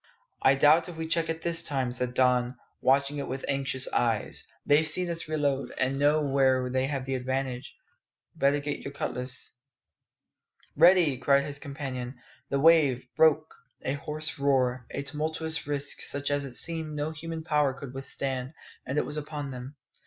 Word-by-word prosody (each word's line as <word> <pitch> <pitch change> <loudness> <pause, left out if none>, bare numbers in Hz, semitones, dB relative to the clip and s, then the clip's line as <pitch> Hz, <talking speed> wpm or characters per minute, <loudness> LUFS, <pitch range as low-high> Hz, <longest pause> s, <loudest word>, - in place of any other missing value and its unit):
"I 130 - +5
doubt 155 +5 +4
if 170 - -9
we 160 0 -4
check 165 0 0
it 165 0 -3
this 170 -1 +3
time," 135 -4 -1
said 125 0 -1
Don, 125 -1 +2 0.2
watching 140 +2 +2
it 140 - -4
with 130 +1 -4
anxious 135 -1 +1
eyes; 115 -3 -1 0.2
"they've 150 +2 +4
seen 175 +2 +1
us 165 -2 -3
reload, 145 -3 -1
and 135 +2 +1
know 150 +2 +3
where 130 -2 +2
they 130 +1 +1
have 135 -2 -3
the 135 - -3
advantage. 130 0 -3 0.6
Better 140 +1 +2
get 145 0 -3
your 140 - -7
cutlass 125 -2 -3 0.6
" - - -37
"Ready!" 170 -8 +5
cried 140 +2 +3
his 145 0 -2
companion. 135 -4 -5 0.3
The 140 - 0
wave, 145 -5 +4
broke. 155 0 +3 0.3
A 130 - -1
hoarse 150 +2 -5
roar, 130 -3 +1
a 140 - -4
tumultuous 160 +1 -3
rusk 145 -1 -2
such 140 0 -1
as 145 0 0
it 130 -3 -4
seemed 160 -1 0
no 150 +1 -2
human 160 +1 -6
power 150 -4 +2
could 135 -1 -9
withstand, 135 +1 -4 0.3
and 140 - -2
it - - +2
was 150 - -5
upon 145 -2 -5
them. 130 +3 -8
140 Hz, 175 wpm, -28 LUFS, 130-155 Hz, 0.6 s, I